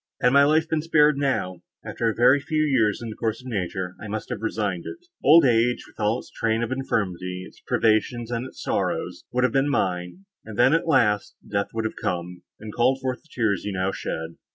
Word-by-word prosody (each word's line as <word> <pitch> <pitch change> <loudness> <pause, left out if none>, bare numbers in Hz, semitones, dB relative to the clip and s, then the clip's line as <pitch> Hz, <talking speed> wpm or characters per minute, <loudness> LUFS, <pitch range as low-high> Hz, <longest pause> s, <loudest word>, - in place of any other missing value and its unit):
Had 125 - +3
my 140 0 +7
life 155 +2 +3
been 160 -1 0
spared 150 -2 +4
now, 95 -11 -1 0.2
after 115 - -1
a 110 - -3
very 130 +4 +5
few 155 +2 0
years, 120 -9 +2
in 115 - -5
the - - -8
course 110 0 -2
of 125 - -15
nature, 95 -5 -3
I 110 - -6
must 105 +1 -5
have - - -4
resigned 105 -5 -2
it; 355 - -9 0.2
old 160 +1 +7
age, 120 0 +2
with - - -20
all 105 +2 +1
its - - -11
train 115 +1 0
of 120 - -3
infirmity, 95 -8 -2
its - - -18
privations 115 +2 +1
and 120 +2 -2
its - - -11
sorrows, - - -2
would 125 +1 +1
have 125 - +2
been 135 +1 +2
mine; 90 - -2 0.2
and 110 -2 -9
then, 125 +4 +5
at 165 +1 +1
last, 105 -9 +2
death 100 0 -1
would 115 -1 -1
have 110 - -4
come, 90 0 -3 0.2
and 105 0 -8
called 125 +2 +2
forth 130 -1 -3
the 160 - -28
tears 110 -5 0
you 105 - -3
now 95 +1 0
shed. 80 -3 -5
115 Hz, 225 wpm, -24 LUFS, 100-135 Hz, 0.2 s, my